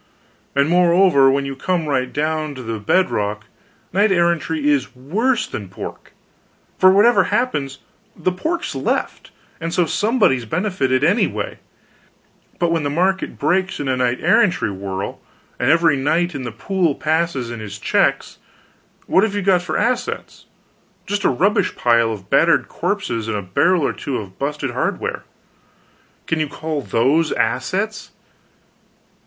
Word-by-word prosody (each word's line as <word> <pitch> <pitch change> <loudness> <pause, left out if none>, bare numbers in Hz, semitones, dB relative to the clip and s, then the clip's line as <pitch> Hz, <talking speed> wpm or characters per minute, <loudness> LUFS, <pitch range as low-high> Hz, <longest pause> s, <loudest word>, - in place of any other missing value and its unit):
And, 140 +1 +3
moreover, 175 -4 +5
when 140 +1 +1
you 135 0 -5
come 170 +4 -1
right 130 -3 0
down 155 0 -2
to 130 - -8
the 115 -1 -4
bedrock, 105 - 0 0.5
knight 200 +3 +3
errantry 170 -4 +1
is 140 -3 +1
worse 215 - 0
than 100 -3 -7
pork; - - -9 0.7
for 185 - +7
whatever 210 +5 +5
happens, 145 - -1 0.4
the 185 - -1
pork's 325 - -3
left, - - -2 0.3
and 165 0 -4
so 175 0 +2
somebody's 205 - +1
benefited 145 - 0
anyway; 205 - 0 1.0
but 175 -2 +1
when 165 -1 +1
the 145 - -1
market 185 +5 0
breaks, 185 +5 0
in 145 - -3
a 130 - +1
knight 125 -1 0
errantry - - +2
whirl, 95 0 -5 0.4
and 125 - +1
every 165 -1 +4
knight 160 +6 0
in 135 -3 -5
the 120 - -4
pool 170 - -1
passes 155 -6 -1
in 120 - -6
his 100 -2 -7
checks, 105 - 0 0.7
what 190 - +3
have 215 -2 0
you 205 - -1
got 185 -2 +3
for 175 -3 -3
assets? 245 +3 -2 0.6
Just 205 +1 -2
a - - +5
rubbish 195 - +1
pile 115 -1 +3
of 100 -3 -7
battered - - +3
corpses 115 -2 -2
and 110 -2 -1
a 100 - -4
barrel 165 - +2
or - - 0
two 135 - -4
of 95 -3 -9
busted 140 -1 -2
hardware. 125 - -3 1.0
Can 160 - -1
you 155 - 0
call 155 +1 -4
those 140 +7 +1
assets? 195 - -1
155 Hz, 150 wpm, -20 LUFS, 130-185 Hz, 1.0 s, for